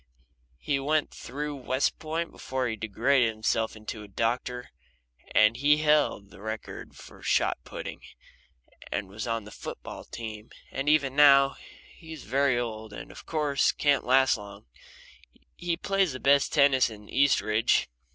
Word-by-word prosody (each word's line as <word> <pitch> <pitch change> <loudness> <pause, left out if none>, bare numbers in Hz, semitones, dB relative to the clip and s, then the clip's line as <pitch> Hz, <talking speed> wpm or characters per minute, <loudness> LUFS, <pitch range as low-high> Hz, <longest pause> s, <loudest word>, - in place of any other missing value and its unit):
He 140 - -1
went 150 +2 0
through 145 +3 -5
West 130 +1 -1
Point 165 +1 -3
before 130 -1 -3
he 110 - -2
degraded 115 +4 +2
himself 110 0 -1
into 110 0 -7
a 105 - -10
doctor, 125 +4 -2 0.6
and 105 +1 +5
he 145 +4 +4
held 150 -10 +2
the 95 - -14
record 110 +1 -6
there - - -22
for - - -14
shot - - +1
putting, - - -7 0.9
and 100 - -2
was 105 +4 -6
on 115 -1 -1
the 105 - -12
foot - - -7
ball - - -8
team, 110 -1 -8 0.2
and 135 +2 -1
even 140 -3 +2
now, 140 -2 +7
when - - -15 0.4
he's 160 -3 -10
very 135 +1 +2
old 110 -3 -4
and - - -9
of - - -13
course 150 -3 +1
can't 145 -1 +2
last 130 +1 +4
long, 100 -1 -11 0.9
he 175 -1 -2
plays 195 -4 +1
the 130 - -6
best 140 +1 +3
tennis 140 -3 +4
in 105 -2 -12
Eastridge. 115 -5 +2
130 Hz, 160 wpm, -27 LUFS, 110-145 Hz, 0.9 s, now